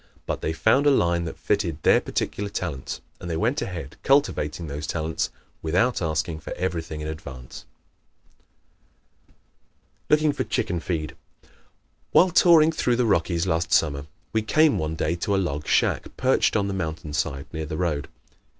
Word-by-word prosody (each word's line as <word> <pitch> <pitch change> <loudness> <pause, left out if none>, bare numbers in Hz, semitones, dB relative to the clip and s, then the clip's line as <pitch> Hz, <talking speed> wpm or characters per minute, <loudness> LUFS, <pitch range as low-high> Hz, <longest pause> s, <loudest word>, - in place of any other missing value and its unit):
But - - -3
they - - -1
found 120 - +3
a - - +8
line 85 -10 +2
that 80 - -6
fitted 90 -7 -1
their - - +5
particular 100 0 -3
talents, 85 -9 -4 0.2
and 90 - -7
they 80 - -1
went 125 - 0
ahead 80 -6 -6
cultivating 90 - +1
those 75 0 -5
talents 80 0 -2 0.3
without 95 +10 +1
asking 80 0 -1
for 75 - -9
everything 80 -4 -3
in 75 - -4
advance. 65 -6 -8 2.4
Looking 150 -1 +4
for - - -1
"Chicken 85 0 -1
Feed" 80 -3 -3 0.3
¶ - - -27 0.6
While 180 0 +6
touring 165 -2 +6
through 125 -6 +1
the 125 0 +1
Rockies 85 -4 +1
last 80 -2 0
summer 70 -2 +2 0.3
we 110 - +2
came 155 +7 +3
one 80 +1 -2
day 80 +1 0
to 100 +3 0
a - - +2
log 75 -6 -2
shack - - +1
perched 130 +1 +2
on 100 -2 +2
the 100 - -2
mountain 80 -4 -4
side 70 -2 -2
near 80 -1 -4
the 80 - -4
road. 75 -6 -1
85 Hz, 165 wpm, -25 LUFS, 80-110 Hz, 2.4 s, a